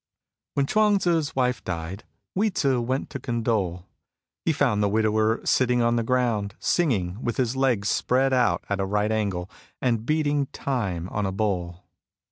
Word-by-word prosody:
When 140 Hz, -, +2 dB
Chuang 210 Hz, +5 st, +3 dB
Tzu's 165 Hz, -5 st, 0 dB
wife 125 Hz, -1 st, 0 dB
died, 85 Hz, +3 st, -5 dB, 0.3 s
Hui 210 Hz, +3 st, +2 dB
Tzu 135 Hz, -9 st, +1 dB
went 130 Hz, +3 st, -2 dB
to 140 Hz, -, -5 dB
condole. 110 Hz, -8 st, -1 dB, 0.6 s
He -, -, +2 dB
found 105 Hz, 0 st, +1 dB
the 100 Hz, -, +2 dB
widower 110 Hz, +1 st, +2 dB
sitting 125 Hz, -2 st, +3 dB
on 120 Hz, 0 st, +2 dB
the 120 Hz, -, +1 dB
ground, 115 Hz, -4 st, 0 dB
singing, 105 Hz, -, 0 dB
with 120 Hz, -3 st, -2 dB
his 125 Hz, -1 st, 0 dB
legs 125 Hz, -7 st, +1 dB
spread 130 Hz, +1 st, +2 dB
out 125 Hz, -2 st, +2 dB
at 100 Hz, -1 st, -1 dB
a 95 Hz, -, +1 dB
right 105 Hz, +2 st, 0 dB
angle, 100 Hz, -5 st, -1 dB, 0.3 s
and 115 Hz, -4 st, 0 dB
beating 145 Hz, 0 st, +1 dB
time 105 Hz, -, -3 dB
on 105 Hz, -2 st, -1 dB
a -, -, -2 dB
bowl. 90 Hz, -4 st, -2 dB
115 Hz, 165 wpm, -25 LUFS, 100-130 Hz, 0.6 s, Chuang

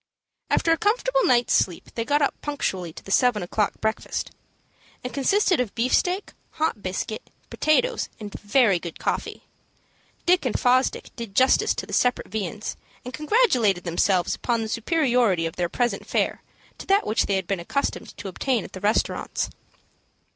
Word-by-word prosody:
After 330 Hz, -, +2 dB
a 330 Hz, -, +4 dB
comfortable -, -, +1 dB
night's 245 Hz, -1 st, +3 dB
sleep, 180 Hz, -3 st, +1 dB
they 230 Hz, -, -2 dB
got 290 Hz, +4 st, +2 dB
up 280 Hz, -, +2 dB
punctually 190 Hz, -, -2 dB
to -, -, -12 dB
the 195 Hz, -, -8 dB
seven 245 Hz, -3 st, +3 dB
o'clock 205 Hz, +3 st, 0 dB
breakfast. 220 Hz, 0 st, -2 dB, 0.7 s
It 250 Hz, -, -5 dB
consisted 360 Hz, +5 st, +2 dB
of 245 Hz, -5 st, -2 dB
beefsteak, 355 Hz, -, +1 dB, 0.2 s
hot 310 Hz, -9 st, -1 dB
biscuit, 190 Hz, +3 st, -4 dB, 0.2 s
potatoes, 310 Hz, +11 st, +1 dB
and 210 Hz, -2 st, -7 dB
very 205 Hz, -3 st, +3 dB
good 170 Hz, -1 st, -7 dB
coffee. -, -, -3 dB, 0.8 s
Dick 360 Hz, +1 st, +4 dB
and 255 Hz, -, -1 dB
Fosdick 255 Hz, +1 st, +1 dB
did 230 Hz, -5 st, -7 dB
justice 260 Hz, +1 st, +4 dB
to -, -, -4 dB
the -, -, -10 dB
separate 250 Hz, 0 st, +1 dB
viands, 215 Hz, 0 st, -4 dB, 0.3 s
and 250 Hz, -, -7 dB
congratulated 260 Hz, -, +2 dB
themselves 175 Hz, +1 st, +1 dB
upon 235 Hz, -2 st, -1 dB
the 220 Hz, -, -5 dB
superiority 235 Hz, -, +2 dB
of 165 Hz, -, -4 dB
their 175 Hz, -1 st, -1 dB
present 245 Hz, +6 st, -1 dB
fare -, -, 0 dB, 0.4 s
to -, -, -9 dB
that 395 Hz, +1 st, +3 dB
which 215 Hz, -, +1 dB
they 200 Hz, -, +1 dB
had 190 Hz, -1 st, -1 dB
been 195 Hz, 0 st, -2 dB
accustomed 280 Hz, +11 st, -3 dB
to 205 Hz, -, -7 dB
obtain 230 Hz, +4 st, -1 dB
at -, -, -11 dB
the 185 Hz, -, -8 dB
restaurants. 210 Hz, +2 st, 0 dB
235 Hz, 165 wpm, -24 LUFS, 195-285 Hz, 0.8 s, a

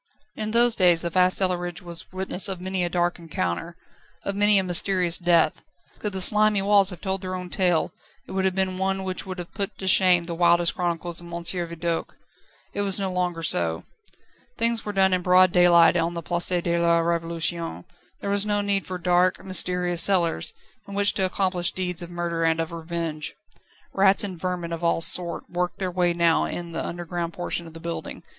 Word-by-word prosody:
In 215 Hz, 0 st, -3 dB
those 235 Hz, +1 st, +4 dB
days 175 Hz, -4 st, +4 dB
the 170 Hz, -, -3 dB
vast 185 Hz, +1 st, +3 dB
cellarage 175 Hz, -2 st, -1 dB
was 170 Hz, -1 st, -5 dB
witness 185 Hz, +1 st, -1 dB
of 190 Hz, -2 st, -4 dB
many 185 Hz, 0 st, -3 dB
a 175 Hz, -, -1 dB
dark 175 Hz, 0 st, -1 dB
encounter, 165 Hz, -, -4 dB, 0.5 s
of 200 Hz, -, -3 dB
many 205 Hz, 0 st, +3 dB
a 190 Hz, -, +2 dB
mysterious 180 Hz, -1 st, +1 dB
death; 170 Hz, -3 st, +2 dB, 0.4 s
could 210 Hz, -, -3 dB
the 190 Hz, -1 st, -3 dB
slimy 210 Hz, +1 st, +4 dB
walls 200 Hz, -1 st, +4 dB
have 180 Hz, -4 st, -9 dB
told 190 Hz, -1 st, -2 dB
their 185 Hz, -1 st, -4 dB
own 180 Hz, -1 st, -7 dB
tale, 175 Hz, -4 st, +1 dB, 0.3 s
it -, -, -12 dB
would 190 Hz, 0 st, -1 dB
have 190 Hz, -1 st, 0 dB
been 190 Hz, -1 st, -1 dB
one 190 Hz, 0 st, -1 dB
which 185 Hz, 0 st, -5 dB
would 185 Hz, 0 st, -6 dB
have 175 Hz, -1 st, -8 dB
put 200 Hz, -1 st, -3 dB
to 190 Hz, -, -7 dB
shame 185 Hz, -2 st, +5 dB
the 170 Hz, 0 st, -6 dB
wildest 170 Hz, 0 st, +3 dB
chronicles 175 Hz, -1 st, -2 dB
of 170 Hz, -, -12 dB
M. 170 Hz, 0 st, -5 dB
Vidoq. 170 Hz, 0 st, 0 dB, 0.4 s
Now -, -, -26 dB, 0.6 s
it 205 Hz, -, -2 dB
was 200 Hz, -1 st, +2 dB
no 190 Hz, -1 st, -2 dB
longer 175 Hz, -2 st, -2 dB
so. 85 Hz, -, +1 dB, 0.7 s
Things 230 Hz, -1 st, +1 dB
were 210 Hz, -, -4 dB
done 190 Hz, -1 st, +2 dB
in 180 Hz, -, +1 dB
broad 185 Hz, 0 st, +4 dB
daylight 175 Hz, -1 st, +5 dB
on 170 Hz, 0 st, -1 dB
the 170 Hz, -, -5 dB
Place 175 Hz, +1 st, +2 dB
de 170 Hz, -1 st, 0 dB
la 170 Hz, 0 st, +3 dB
Révolution: 165 Hz, -, -2 dB, 0.4 s
there 200 Hz, -, -3 dB
was 200 Hz, 0 st, +2 dB
no 205 Hz, -1 st, 0 dB
need 200 Hz, -1 st, -1 dB
for 185 Hz, -, -4 dB
dark, 180 Hz, +1 st, +1 dB
mysterious 180 Hz, -1 st, +1 dB
cellars, 170 Hz, -, +3 dB, 0.3 s
in 200 Hz, -, -8 dB
which 200 Hz, 0 st, +3 dB
to 190 Hz, -, 0 dB
accomplish 185 Hz, -2 st, 0 dB
deeds 180 Hz, -1 st, -3 dB
of 170 Hz, -, -8 dB
murder 170 Hz, -1 st, -3 dB
and 165 Hz, 0 st, +1 dB
of 165 Hz, 0 st, -3 dB
revenge. 165 Hz, -2 st, -5 dB, 0.6 s
Rats 195 Hz, +1 st, +4 dB
and 185 Hz, -5 st, -6 dB
vermin 180 Hz, -2 st, -3 dB
of 165 Hz, +1 st, -6 dB
all 170 Hz, 0 st, +1 dB
sorts 170 Hz, 0 st, +3 dB
worked 180 Hz, 0 st, -3 dB
their 185 Hz, -2 st, -3 dB
way 175 Hz, -1 st, +1 dB
now 170 Hz, -1 st, +2 dB
in 170 Hz, -1 st, -6 dB
the -, -, -4 dB
underground 175 Hz, 0 st, -5 dB
portion 175 Hz, -1 st, -3 dB
of 165 Hz, -, -13 dB
the -, -, -8 dB
building. 170 Hz, 0 st, -6 dB
180 Hz, 205 wpm, -24 LUFS, 170-190 Hz, 0.7 s, shame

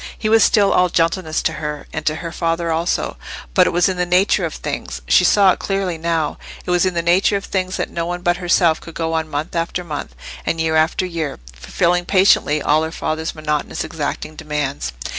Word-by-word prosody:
He 215 Hz, -, -1 dB
was 225 Hz, 0 st, +6 dB
still 200 Hz, -2 st, +4 dB
all 180 Hz, 0 st, +3 dB
gentleness 165 Hz, -1 st, 0 dB
to 165 Hz, -, 0 dB
her, 150 Hz, -1 st, -4 dB
and 160 Hz, -, -3 dB
to 155 Hz, -, +2 dB
her 165 Hz, +1 st, -6 dB
father 165 Hz, 0 st, -1 dB
also. 165 Hz, +2 st, -1 dB, 0.4 s
But -, -, +5 dB
it -, -, +3 dB
was 175 Hz, 0 st, +2 dB
in 185 Hz, -1 st, -2 dB
the 180 Hz, -, +1 dB
nature 180 Hz, +1 st, +3 dB
of 160 Hz, -, -5 dB
things—she -, -, 0 dB
saw 200 Hz, -2 st, +5 dB
it -, -, -3 dB
clearly 195 Hz, -4 st, -2 dB
now—it 165 Hz, +1 st, -3 dB
was 180 Hz, +1 st, +3 dB
in 185 Hz, -, -2 dB
the 170 Hz, -, 0 dB
nature 185 Hz, +4 st, +3 dB
of 195 Hz, -, -7 dB
things 185 Hz, -1 st, -2 dB
that -, -, -3 dB
no 170 Hz, 0 st, -3 dB
one 175 Hz, 0 st, -4 dB
but 175 Hz, 0 st, +2 dB
herself 175 Hz, -2 st, +2 dB
could 165 Hz, -, -11 dB
go 165 Hz, -1 st, -2 dB
on 160 Hz, -1 st, -1 dB
month 150 Hz, +3 st, -4 dB
after 170 Hz, +2 st, -2 dB
month, 145 Hz, -, -6 dB, 0.3 s
and 165 Hz, -, -2 dB
year 160 Hz, -1 st, +1 dB
after 160 Hz, +3 st, +2 dB
year, 165 Hz, -5 st, -4 dB, 0.2 s
fulfilling 175 Hz, -, 0 dB
patiently 185 Hz, -6 st, +3 dB
all 155 Hz, +1 st, +3 dB
her 160 Hz, 0 st, -3 dB
father's 160 Hz, 0 st, -3 dB
monotonous 150 Hz, -1 st, -2 dB
exacting 155 Hz, 0 st, -4 dB
demands. 150 Hz, -, -3 dB
165 Hz, 210 wpm, -19 LUFS, 155-180 Hz, 0.4 s, was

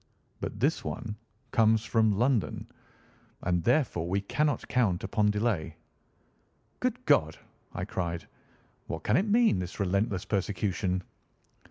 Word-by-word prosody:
But 105 Hz, -, -5 dB
this 145 Hz, +5 st, +2 dB
one 115 Hz, -4 st, -4 dB, 0.4 s
comes 110 Hz, -1 st, +3 dB
from 110 Hz, 0 st, +3 dB
London, 120 Hz, -1 st, +1 dB, 0.8 s
and 90 Hz, -2 st, +1 dB
therefore 120 Hz, -, +2 dB
we 100 Hz, +2 st, +1 dB
cannot 150 Hz, +8 st, 0 dB
count 105 Hz, -9 st, +1 dB
upon 105 Hz, +1 st, +2 dB
delay." 105 Hz, -7 st, 0 dB, 1.0 s
"Good -, -, -2 dB
God!" -, -, +3 dB, 0.4 s
I -, -, -3 dB
cried. 85 Hz, -2 st, -3 dB, 0.6 s
"What 80 Hz, -1 st, -5 dB
can 105 Hz, -, +2 dB
it 195 Hz, +10 st, +2 dB
mean, 225 Hz, -, +4 dB
this 90 Hz, +2 st, -5 dB
relentless 100 Hz, +1 st, 0 dB
persecution?" 95 Hz, -2 st, -1 dB
105 Hz, 125 wpm, -29 LUFS, 90-120 Hz, 1.0 s, mean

